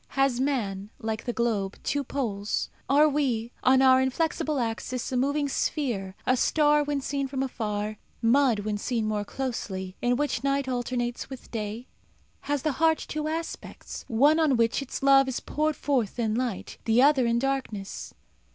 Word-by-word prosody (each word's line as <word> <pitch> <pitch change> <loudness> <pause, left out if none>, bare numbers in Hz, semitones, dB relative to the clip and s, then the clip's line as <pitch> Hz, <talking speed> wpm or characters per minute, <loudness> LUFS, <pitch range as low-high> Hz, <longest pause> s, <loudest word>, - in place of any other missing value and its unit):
Has 270 -3 +3
man, 210 -8 -1
like 220 0 -4
the 245 - 0
globe, 220 -5 -1
two 285 0 0
poles? 215 -7 -2 0.2
Are 290 +3 +6
we, 255 -6 0
on 260 +1 +5
our 260 0 +6
inflexible 305 +2 0
axis, 240 +1 -3
a - - -1
moving 285 +3 +1
sphere, 235 - -2
a 255 - +3
star 295 +3 +3
when 290 -1 -1
seen 275 0 -2
from 265 0 -2
afar, 215 -4 -3 0.2
mud 240 -2 +3
when 210 0 -2
seen 230 0 -1
more 210 -1 -1
closely, 200 -7 -4
in 245 0 +2
which 290 0 -1
night 275 0 +1
alternates 245 -1 -2
with 265 -2 -10
day? 220 +1 -4 0.6
Has 290 -2 0
the 310 - +1
heart 320 -1 +5
two 305 0 -4
aspects 325 +1 -5
one 285 +8 +4
on 295 -6 +3
which 230 +3 +2
its 275 0 -6
love 275 -1 +6
is 260 - -2
poured 305 0 -1
forth 250 -8 -1
in 225 -3 0
light; 240 -4 -3
the 230 +3 +4
other 275 -4 +5
in 235 0 +2
darkness? 245 -6 -3
255 Hz, 170 wpm, -27 LUFS, 225-280 Hz, 0.6 s, Are